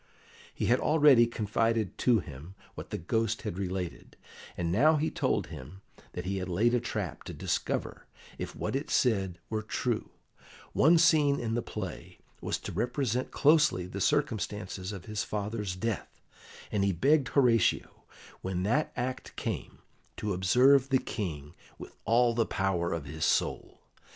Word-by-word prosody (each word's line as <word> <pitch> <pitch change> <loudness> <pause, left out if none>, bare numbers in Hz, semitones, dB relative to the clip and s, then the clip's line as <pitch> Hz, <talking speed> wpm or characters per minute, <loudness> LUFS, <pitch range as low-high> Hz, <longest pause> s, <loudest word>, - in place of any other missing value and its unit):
He - - -3
had 120 +2 +3
already 145 -6 +5
confided 110 -2 0
to 120 -2 +4
him 80 +3 -11 0.2
what - - -9
the - - -3
Ghost 110 +5 -1
had 100 -4 -4
related, 95 -2 -5 0.4
and 85 -1 -1
now 150 - +5
he 155 +1 0
told - - 0
him 75 +10 -10 0.3
that 90 - -5
he 95 +1 -2
had 90 -1 -4
laid 110 +7 +2
a 125 - +3
trap 105 -9 -4
to 90 - -7
discover 90 +3 -3 0.3
if - - -5
what - - -3
it 140 +3 -3
said 95 -8 +1
were 110 -1 -1
true; 115 +2 -2 0.6
one 165 +5 +5
scene 155 -4 +4
in 115 -1 -2
the 120 - 0
play 95 - -7 0.2
was - - -1
to - - -6
represent 125 0 -1
closely 150 - +3
the 95 +2 -6
circumstances 105 -9 -1
of 95 -5 -8
his 105 0 -3
father's 105 -3 -3
death, 110 +3 -4 0.5
and 100 -2 +1
he 100 - +2
begged 135 - +3
Horatio, 120 -6 +2 0.4
when 90 -1 -2
that 130 +10 +1
act 130 +1 -4
came, - - -5 0.3
to 105 -2 -2
observe 125 +9 +4
the 130 - +4
King 85 - -5 0.2
with - - -11
all 120 +1 +4
the 115 -1 +1
power 90 -3 0
of 80 -3 -3
his 80 +2 -5
soul. - - 0
110 Hz, 160 wpm, -29 LUFS, 90-125 Hz, 0.6 s, already